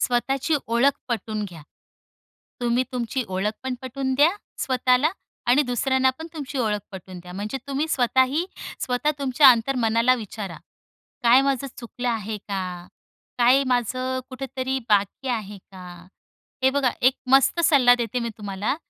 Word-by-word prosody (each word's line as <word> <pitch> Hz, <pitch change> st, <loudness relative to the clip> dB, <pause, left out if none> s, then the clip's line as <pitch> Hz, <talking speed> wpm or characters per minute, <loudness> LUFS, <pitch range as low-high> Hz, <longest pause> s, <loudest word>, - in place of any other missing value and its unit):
स्वतःची 270 Hz, +5 st, 0 dB
ओळख 240 Hz, +5 st, +2 dB
पटवून 215 Hz, -2 st, -2 dB
घ्या. 170 Hz, -6 st, -10 dB, 1.0 s
तुम्ही 240 Hz, +1 st, +1 dB
तुमची 245 Hz, +1 st, -2 dB
ओळख 190 Hz, +3 st, -1 dB
पण 260 Hz, -1 st, -2 dB
पटवून 265 Hz, +1 st, -2 dB
द्या, 295 Hz, +5 st, +5 dB, 0.3 s
स्वतःला 255 Hz, +3 st, +2 dB, 0.4 s
आणि 280 Hz, +4 st, +5 dB
दुसऱ्यांना 260 Hz, +2 st, +2 dB
पण 320 Hz, -, -6 dB
तुमची 285 Hz, -2 st, -5 dB
ओळख 210 Hz, -3 st, 0 dB
पटवून 185 Hz, -1 st, -9 dB
द्या. 180 Hz, +1 st, -11 dB
म्हणजे 210 Hz, +7 st, -4 dB
तुम्ही 280 Hz, +3 st, -1 dB
स्वतःही 260 Hz, +4 st, +2 dB, 0.4 s
स्वतः 250 Hz, +4 st, 0 dB
तुमच्या 270 Hz, 0 st, +5 dB
अंतर्मनाला 235 Hz, 0 st, +2 dB
विचारा, 210 Hz, -5 st, -6 dB, 0.7 s
"काय 240 Hz, +3 st, +6 dB
माझं 275 Hz, -1 st, 0 dB
चुकलं 245 Hz, +1 st, -5 dB
आहे 220 Hz, -2 st, -2 dB
का? 180 Hz, -3 st, -4 dB, 0.5 s
काय 250 Hz, +3 st, +5 dB
माझं 255 Hz, +1 st, -1 dB
कुठेतरी 265 Hz, 0 st, -3 dB
बाकी 205 Hz, +6 st, +1 dB
आहे 210 Hz, -4 st, -3 dB
का?" 185 Hz, -1 st, -11 dB, 0.8 s
हे 265 Hz, -, +5 dB
बघा 270 Hz, -3 st, +1 dB
एक 255 Hz, +2 st, +5 dB, 0.2 s
मस्त 270 Hz, +5 st, +5 dB
सल्ला 255 Hz, -5 st, +6 dB
देते 235 Hz, +1 st, -2 dB
मी 235 Hz, -, -2 dB
तुम्हाला, 205 Hz, +5 st, -2 dB
250 Hz, 140 wpm, -24 LUFS, 215-265 Hz, 1.0 s, काय